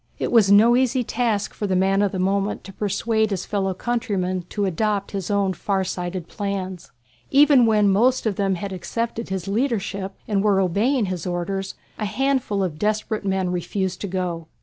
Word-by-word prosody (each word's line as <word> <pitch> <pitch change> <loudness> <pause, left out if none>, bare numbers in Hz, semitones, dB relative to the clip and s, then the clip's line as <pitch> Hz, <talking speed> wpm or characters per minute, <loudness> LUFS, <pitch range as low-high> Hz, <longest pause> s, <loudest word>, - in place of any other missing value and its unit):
It - - -2
was 215 -5 +5
no 225 +4 +7
easy 255 0 +2
task 225 -4 -1
for 205 - -3
the 190 - 0
man 195 +2 +2
of 205 -2 +2
the - - -3
moment 195 +2 0
to 195 - -10
persuade 220 +2 0
his 195 -3 -3
fellow 195 -2 -1
countrymen 190 -6 -2
to 205 -1 -1
adopt 200 +2 -1
his 195 -3 -4
own 200 -2 +1
far 190 +2 -1
sighted 180 -1 -4
plans. 190 -4 -4 0.4
Even 275 -4 +6
when 210 -2 +4
most 235 +7 +3
of 215 -3 0
them 195 -1 +1
had 195 +2 -5
accepted 230 +5 -4
his 190 -2 -3
leadership 200 -4 -1
and 200 -2 +1
were 205 -2 +3
obeying 210 +7 +1
his 185 -2 -4
orders, 190 +2 -3 0.2
a 215 - -1
handful 255 -3 0
of 160 -5 -3
desperate 215 +1 -1
men 190 -2 0
refused 180 +2 -2
to 205 - -3
go. 175 -3 -3
200 Hz, 185 wpm, -23 LUFS, 185-220 Hz, 0.4 s, no